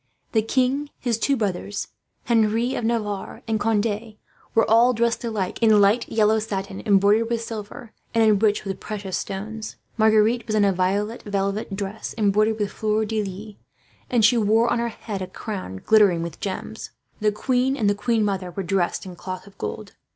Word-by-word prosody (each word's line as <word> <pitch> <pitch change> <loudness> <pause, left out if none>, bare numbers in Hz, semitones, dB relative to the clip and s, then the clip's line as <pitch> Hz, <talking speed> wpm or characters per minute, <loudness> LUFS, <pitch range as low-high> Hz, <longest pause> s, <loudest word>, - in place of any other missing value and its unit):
The 220 - +3
king, 260 +5 0
his 235 -3 -1
two 275 +3 +1
brothers, 205 -1 -3 0.4
Henri 230 +2 +2
of - - -3
Navarre, 215 -3 -2
and 220 -1 0
Conde 215 0 -1 0.4
were 225 - +4
all 235 +3 +5
dressed 235 +1 0
alike 215 -5 -3
in 220 -2 +6
light 205 +4 +3
yellow 220 0 +3
satin, 195 -2 -4
embroidered 205 +3 +4
with 230 -1 -1
silver, 220 0 -8 0.2
and 225 - +5
enriched 210 -1 +3
with 195 -1 -4
precious 200 -3 -5
stones. 215 +3 -5 0.2
Marguerite 220 +2 +3
was 215 - -1
in 210 -1 +4
a 195 - +3
violet 200 +5 0
velvet 200 0 -2
dress, 200 +2 -5
embroidered 215 +1 +2
with 205 -2 -2
fleurs 215 0 0
de 220 -1 0
lis, 205 +2 -7 0.5
and 235 -4 +4
she 235 +1 +5
wore 225 +3 +3
on 240 - 0
her 235 0 0
head 210 -3 -6
a 185 - -3
crown 185 - -6
glittering 200 -6 +5
with 170 -2 -7
gems. 205 +3 -5 0.3
The 210 0 +2
queen 255 +5 0
and 215 -6 +1
the 205 - +4
queen 220 +1 +1
mother 190 -3 -2
were 190 +3 -4
dressed 185 0 0
in 185 -2 -8
cloth 185 +1 -7
of 200 - -16
gold. 105 - -5
215 Hz, 180 wpm, -23 LUFS, 200-225 Hz, 0.5 s, in